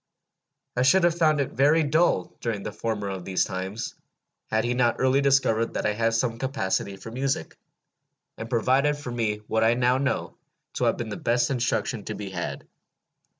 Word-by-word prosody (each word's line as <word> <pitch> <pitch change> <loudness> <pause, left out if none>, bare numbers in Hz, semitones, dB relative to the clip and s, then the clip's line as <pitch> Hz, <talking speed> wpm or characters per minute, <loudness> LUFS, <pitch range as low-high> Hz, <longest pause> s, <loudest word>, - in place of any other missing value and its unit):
I 125 - +1
should 185 +9 +5
have 175 -1 +4
found 155 -3 +3
it 140 - -1
very 150 +5 +4
dull 150 - +2
during 110 -4 -2
the - - -4
former 105 -1 -3
of 95 -2 -5
these 95 0 +1
times, 95 +5 -4 0.6
had 110 0 +1
he 120 - 0
not 120 -1 +2
early 130 +1 +3
discovered 135 -5 +2
that - - -1
I 105 - +2
had 115 +1 +1
some 115 -1 0
capacity 100 -7 -1
for 115 - -9
music, 135 +3 -2 0.8
and 115 - -7
provided 130 +5 +2
for 145 -4 -6
me 110 -3 -2
what 110 +1 +1
I 115 +1 +4
now 125 +1 +2
know 140 0 -1 0.4
to - - -1
have - - +2
been 115 -2 -4
the 105 - -5
best 120 +2 +1
instruction 125 -2 -1
to - - -4
be 100 -2 -6
had. 85 -2 -5
120 Hz, 190 wpm, -26 LUFS, 110-135 Hz, 0.8 s, should